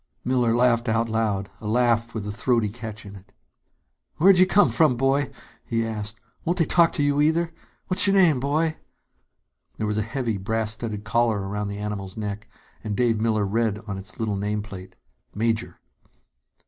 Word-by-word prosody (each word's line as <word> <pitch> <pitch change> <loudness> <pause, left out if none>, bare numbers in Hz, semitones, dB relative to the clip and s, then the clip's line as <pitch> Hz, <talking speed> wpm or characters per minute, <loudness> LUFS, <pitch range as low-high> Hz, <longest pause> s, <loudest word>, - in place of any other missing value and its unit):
Miller 125 -2 +2
laughed 120 -1 +3
out 115 +1 +1
loud, 105 -3 -1
a 105 - -7
laugh 115 0 +1
with 105 -2 -3
a 105 - -3
throaty 115 0 +1
catch 110 -1 -8
in 100 0 -10
it. 95 0 -15 0.9
"Where'd 185 +2 +6
you 185 - +6
come 205 +2 +4
from, 155 -7 +3
boy?" 135 +2 +1 0.3
he 115 -1 -1
asked. 110 -1 -4 0.2
"Won't 175 +2 0
they 165 - +3
talk 170 +1 +4
to 145 - 0
you, 145 0 +2
either? 165 +2 +1 0.3
What's 185 +2 +2
your 200 - +3
name, 170 -8 +5
boy?" 155 +4 0 1.0
There 110 - -2
was 105 0 -1
a - - +1
heavy, 115 0 -2
brass 110 +2 -1
studded 110 -2 -4
collar 115 -3 +1
about 105 +1 -3
the 100 0 -5
animal's 105 -2 -5
neck, 105 0 -5 0.3
and 105 -2 -3
Dave 115 -3 +2
Miller 110 -2 +1
read 110 +1 0
on 100 -2 -5
its 95 0 -8
little 110 -3 -1
nameplate: 100 -2 -5 0.4
"Major." 115 +2 -1
115 Hz, 175 wpm, -24 LUFS, 105-130 Hz, 1.0 s, Where'd